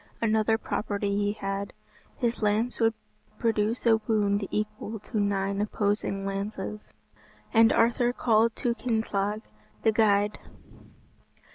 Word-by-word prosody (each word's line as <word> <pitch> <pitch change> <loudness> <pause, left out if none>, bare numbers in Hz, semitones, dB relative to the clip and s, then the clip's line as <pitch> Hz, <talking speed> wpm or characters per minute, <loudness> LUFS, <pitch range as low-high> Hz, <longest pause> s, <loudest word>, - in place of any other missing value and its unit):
Another 220 0 +2
property 205 -2 -2
he 205 0 +1
had; 195 -1 -4 0.4
his 235 -1 -1
lance 215 +3 +1
would 225 -1 +3 0.4
produce 225 +1 0
a 225 -1 +6
wound 205 -2 +1
equal 215 +1 -3
to 215 +2 -4
nine 200 0 0
opposing 205 -1 -1
lances. 195 - -4 0.7
And 225 0 +6
Arthur 240 +1 +3
called 230 -2 +2
to 240 - 0
Kynthelig 220 -3 -1 0.4
the 220 - +4
guide. 210 -1 +2
215 Hz, 115 wpm, -27 LUFS, 200-225 Hz, 0.7 s, a